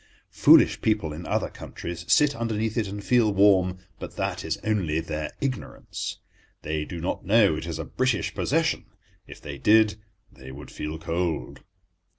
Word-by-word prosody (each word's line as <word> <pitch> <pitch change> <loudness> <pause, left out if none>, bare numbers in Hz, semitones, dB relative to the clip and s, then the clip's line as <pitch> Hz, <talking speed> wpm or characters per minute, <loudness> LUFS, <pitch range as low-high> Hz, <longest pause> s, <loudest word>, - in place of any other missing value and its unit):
Foolish - - +6
people 105 -8 0
in 80 +2 -8
other - - -1
countries 85 0 -7
sit 145 -1 +5
underneath 110 -2 -2
it 110 -4 0
and 100 +1 -6
feel 115 -1 +3
warm, 95 -2 +4 0.2
but - - -8
that - - -2
is - - -2
only 95 -8 0
their 75 -2 -4
ignorance. 135 -3 -4 0.5
They 75 0 -2
do 85 - -7
not 85 - -3
know 100 -4 +4
it 80 +2 -5
is 80 -2 -4
a 80 - -5
British 130 -5 -1
possession; - - 0 0.4
if - - -11
they 70 -1 -8
did 110 0 +4 0.3
they 65 +1 -12
would 70 +2 -10
feel 75 +1 -5
cold. 85 0 -3
90 Hz, 165 wpm, -25 LUFS, 80-110 Hz, 0.5 s, Foolish